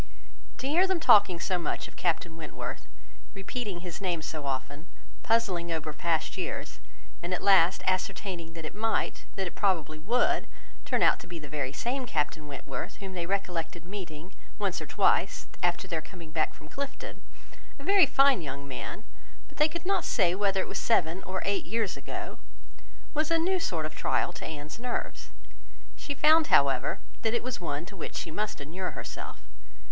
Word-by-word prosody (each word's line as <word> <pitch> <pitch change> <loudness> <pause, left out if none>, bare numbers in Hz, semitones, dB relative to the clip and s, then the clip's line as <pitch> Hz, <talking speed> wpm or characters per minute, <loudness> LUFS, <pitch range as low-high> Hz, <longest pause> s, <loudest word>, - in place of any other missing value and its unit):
To 265 - -3
hear 345 +7 +4
them 380 -2 +1
talking 200 - +6
so 175 +1 0
much 170 - -2
of - - -16
Captain 170 -1 0
Wentworth, 160 -2 -6 0.5
repeating 195 -2 -4
his 180 +1 -6
name 175 -4 0
so 150 -3 -4
often, 140 +4 -4 0.3
puzzling 190 -7 +1
over 155 -1 -2
past 160 +1 0
years, - - -4 0.4
and 180 +1 -1
at - - -5
last 190 -3 +6
ascertaining 185 -2 -1
that 165 -1 -7
it - - -5
might, 220 +2 0
that 195 - -1
it 175 - -5
probably 160 -6 +1
would, 235 +10 +2 0.4
turn - - +2
out - - +5
to - - -11
be 170 0 -6
the 155 -2 -8
very 140 -2 -2
same 245 - -2
Captain 150 -3 -1
Wentworth 135 -2 -5
whom 195 -2 -7
they 175 -2 -3
recollected 175 -4 -2
meeting, 180 -2 -7 0.2
once - - -1
or - - -6
twice, - - +2 0.2
after 175 0 +1
their 165 -2 -1
coming 165 -1 -11
back 155 -1 0
from 150 - -13
Clifton—a 280 - -9
very 390 -2 +6
fine 275 -5 +5
young 140 -2 -5
man—but 140 - -9
they 300 - +7
could 340 +2 -5
not 395 +2 +2
say 180 -5 +3
whether 195 0 +2
it - - -4
was - - -2
seven 180 -5 +2
or 185 0 -2
eight 200 0 +1
years 220 -3 0
ago, - - -6 0.7
was 310 0 +1
a 330 - +4
new 365 +3 +2
sort 165 - -1
of 155 - -4
trial 175 - +1
to - - -8
Anne's 155 +5 -6
nerves. 245 0 -3 0.7
She 285 - -4
found, 310 +3 +6
however, 135 -2 +4 0.2
that 225 +1 +1
it - - 0
was 250 -5 -3
one 150 -1 -2
to 195 - -11
which 170 - -6
she 165 - -3
must 210 +2 -2
inure 175 +6 -4
herself. - - -6
180 Hz, 180 wpm, -29 LUFS, 160-225 Hz, 0.7 s, they